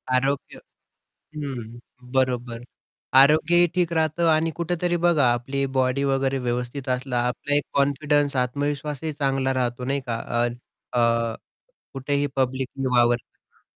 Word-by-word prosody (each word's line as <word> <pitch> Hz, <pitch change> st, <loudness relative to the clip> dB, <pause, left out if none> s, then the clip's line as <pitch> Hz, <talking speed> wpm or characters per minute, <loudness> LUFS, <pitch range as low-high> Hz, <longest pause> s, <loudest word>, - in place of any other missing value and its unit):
आरोग्य 135 Hz, +2 st, -1 dB, 0.8 s
हं, 120 Hz, -6 st, -6 dB, 0.3 s
बरोबर 125 Hz, -3 st, 0 dB, 0.6 s
आरोग्यही 165 Hz, +4 st, +4 dB
ठीक 175 Hz, -2 st, +1 dB
राहतं 160 Hz, +1 st, +1 dB
आणि 160 Hz, +1 st, +2 dB
कुठेतरी 175 Hz, +1 st, 0 dB
बघा 145 Hz, -8 st, +4 dB
आपली 135 Hz, +3 st, -2 dB
बॉडी 130 Hz, +2 st, +1 dB
वगैरे 135 Hz, 0 st, +1 dB
व्यवस्थित 125 Hz, +3 st, -3 dB
असला 125 Hz, 0 st, -1 dB
आपला 145 Hz, +3 st, -2 dB
एक 145 Hz, -, +2 dB
कॉन्फिडन्स 145 Hz, 0 st, +1 dB
आत्मविश्वासही 145 Hz, +3 st, -3 dB
चांगला 135 Hz, -2 st, 0 dB
राहतो, 125 Hz, -1 st, -2 dB
नाही 140 Hz, +1 st, -1 dB
का. 115 Hz, -1 st, -1 dB, 0.3 s
अ, -, -, +1 dB, 0.5 s
अ, 115 Hz, -1 st, +2 dB, 0.6 s
कुठेही 140 Hz, +1 st, -1 dB
पब्लिकली 130 Hz, 0 st, -1 dB
वावरताना. 120 Hz, 0 st, -1 dB
135 Hz, 120 wpm, -24 LUFS, 125-145 Hz, 0.8 s, आरोग्यही